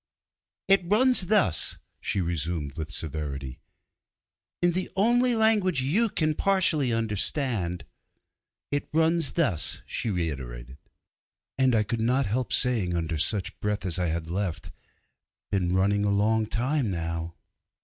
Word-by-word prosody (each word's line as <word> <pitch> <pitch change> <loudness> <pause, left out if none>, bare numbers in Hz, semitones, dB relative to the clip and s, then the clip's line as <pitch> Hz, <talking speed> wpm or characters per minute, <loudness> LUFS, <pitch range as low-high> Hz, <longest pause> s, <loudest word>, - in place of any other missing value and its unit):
'It 195 -1 +5
runs 215 +1 +4
thus,' 205 - +2 0.2
she 100 - -2
resumed 80 -3 -3
with 80 -2 -5
severity, 70 -4 -3 1.0
'in 175 - +4
the 185 +2 -2
only 240 +5 +3
language 210 - +2
you 210 - +2
can 155 -5 0
partially 160 -8 +2
understand 110 - -1 0.9
'It 145 0 -2
runs 160 0 +1
thus,' 125 - 0
she 115 - -4
reiterated, 65 - -5 0.8
and 130 -2 +3
I 110 - +3
could 115 +2 -3
not 125 +4 +1
help 115 +3 -2
saying 110 -9 +3
under 80 -2 -2
such 100 +4 -1
breath 105 -1 -2
as 90 0 -1
I 90 - 0
had 80 0 -3
left, 90 0 -4 0.8
'Been 90 -2 0
running 100 +2 +2
a 105 - +1
long 110 +2 +1
time 130 +2 -1
now.' 85 -1 -4
105 Hz, 130 wpm, -26 LUFS, -, 1.0 s, It